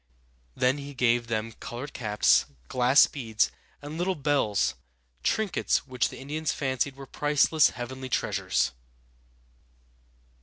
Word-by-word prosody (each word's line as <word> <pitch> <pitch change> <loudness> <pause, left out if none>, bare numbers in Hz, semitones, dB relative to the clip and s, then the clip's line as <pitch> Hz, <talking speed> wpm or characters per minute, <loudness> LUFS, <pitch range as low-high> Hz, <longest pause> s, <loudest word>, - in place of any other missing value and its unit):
Then 130 +3 +2
he 140 0 -8
gave 120 -1 +2
them 115 0 -2
colored 120 +5 -8
caps, 105 -4 +3 0.2
glass 125 +3 +5
beads, 115 - -1 0.3
and 150 +3 -6
little 185 +1 0
bells, 140 -8 +1 0.5
trinkets 215 - 0
which 125 -3 0
the - - -10
Indians 150 +3 -3
fancied 135 0 -1
were 135 0 -9
priceless 150 +2 +3
heavenly 130 +2 -7
treasures! - - 0
130 Hz, 115 wpm, -27 LUFS, 120-145 Hz, 0.5 s, glass